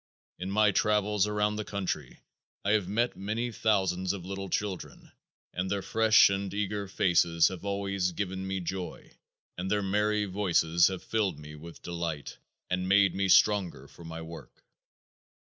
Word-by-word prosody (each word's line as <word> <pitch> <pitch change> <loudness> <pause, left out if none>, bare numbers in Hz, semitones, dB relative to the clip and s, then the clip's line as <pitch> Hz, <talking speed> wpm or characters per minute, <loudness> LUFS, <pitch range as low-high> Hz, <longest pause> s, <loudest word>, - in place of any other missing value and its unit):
In 90 +1 -4
my 105 +1 +4
travels 105 -1 +2
about 105 0 0
the 105 - -2
country 95 -10 -4 0.4
I 100 - +2
have 105 -4 +2
met 115 +5 0
many 110 +5 -3
thousands 95 -4 +1
of 95 -3 -7
little 95 0 -5
children 100 -2 -4 0.4
and 90 +1 -2
their 100 0 -1
fresh 110 -3 +5
and 100 0 -2
eager 100 0 -2
faces 85 -3 +3
have 95 -1 -8
always 100 -2 -1
given 95 +1 -4
me 95 -1 -2
joy 90 0 -6 0.5
and 95 +1 -3
their 105 0 +1
merry 105 +2 +1
voices 85 -4 +2
have 95 -2 -4
filled 100 -8 -1
me 75 0 -10
with 80 +3 -12
delight 85 -4 -5 0.3
and 90 0 -2
made 100 -1 +5
me 95 0 0
stronger 90 -8 +3
for 85 - -15
my 80 0 -7
work. 80 0 -11
95 Hz, 160 wpm, -29 LUFS, 90-105 Hz, 0.5 s, fresh